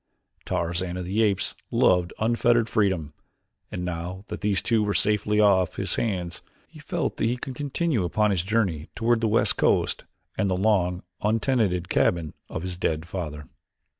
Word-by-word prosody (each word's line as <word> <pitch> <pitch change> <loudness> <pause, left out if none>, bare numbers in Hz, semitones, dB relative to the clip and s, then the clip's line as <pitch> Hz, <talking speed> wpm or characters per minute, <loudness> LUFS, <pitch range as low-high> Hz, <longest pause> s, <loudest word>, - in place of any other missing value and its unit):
Tarzan 85 +2 -2
of 90 - -4
the 100 +5 0
Apes 100 -3 +1 0.2
loved 90 -1 +3
unfettered 115 +1 +2
freedom, 95 -10 0 0.6
and 90 0 -4
now 90 +2 -5
that 105 - -5
these 100 -2 0
two 115 -3 +2
were 105 -1 0
safely 105 0 +1
off 95 -4 +4
his - - -1
hands, 90 -5 -2 0.3
he - - -15
felt - - -2
that - - 0
he 120 +2 +1
could 130 +1 -6
continue 145 - -1
upon 105 +5 +1
his 95 -4 +1
journey 95 -6 -1
toward 115 +1 +2
the 115 - +2
west 110 +2 +2
coast - - +1 0.3
and 100 - 0
the 90 - +1
long 95 -3 +1 0.2
untenanted 105 -4 +1
cabin 85 -4 +1 0.2
of 80 - -5
his 90 -1 -4
dead 80 -2 -1
father. 75 -5 -5
95 Hz, 165 wpm, -25 LUFS, 90-110 Hz, 0.6 s, off